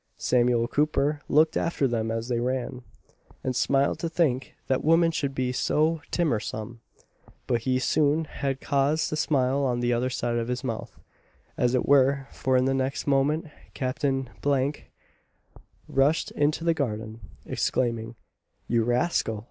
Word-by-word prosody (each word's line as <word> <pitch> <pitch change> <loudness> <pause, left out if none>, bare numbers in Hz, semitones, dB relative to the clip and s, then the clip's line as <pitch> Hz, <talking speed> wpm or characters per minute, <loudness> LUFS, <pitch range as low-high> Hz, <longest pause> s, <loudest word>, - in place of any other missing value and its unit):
Samuel 120 -1 +2
Cooper 150 +1 +1
looked 155 +2 +4
after 165 -5 +1
them 115 -2 -1
as 115 +1 -3
they 120 -2 0
ran, 125 0 -2 0.6
and 130 -1 -2
smiled 140 +1 +2
to 165 - -2
think 135 -7 0
that 130 - 0
women 165 +2 +4
should 140 -4 -2
be 130 -1 0
so 155 +5 +1
"timmersome." 115 -7 -2 0.7
But 120 -2 0
he 130 +2 +1
soon 150 +4 +2
had 135 -2 -3
cause 140 +4 +1
to - - -2
smile 140 -2 +1
on 125 -2 0
the 120 0 +1
other 120 +2 0
side 120 -1 -1
of 115 0 -2
his 125 0 -3
mouth, 115 -4 -5 0.6
as 125 +1 +1
it 125 - +1
were; 140 0 +4
for 130 -1 +1
in 125 - +2
the 135 - +2
next 135 +1 -1
moment 145 +3 +1 0.3
Captain 135 0 -1 0.2
F 140 0 +1 1.1
rushed 140 +4 +2
into 150 +2 0
the 170 0 +3
garden, 110 -6 -3 0.3
exclaiming, 115 -2 -1 0.5
"You 115 -1 +2
rascal! 120 -2 0
130 Hz, 150 wpm, -26 LUFS, 120-145 Hz, 1.1 s, looked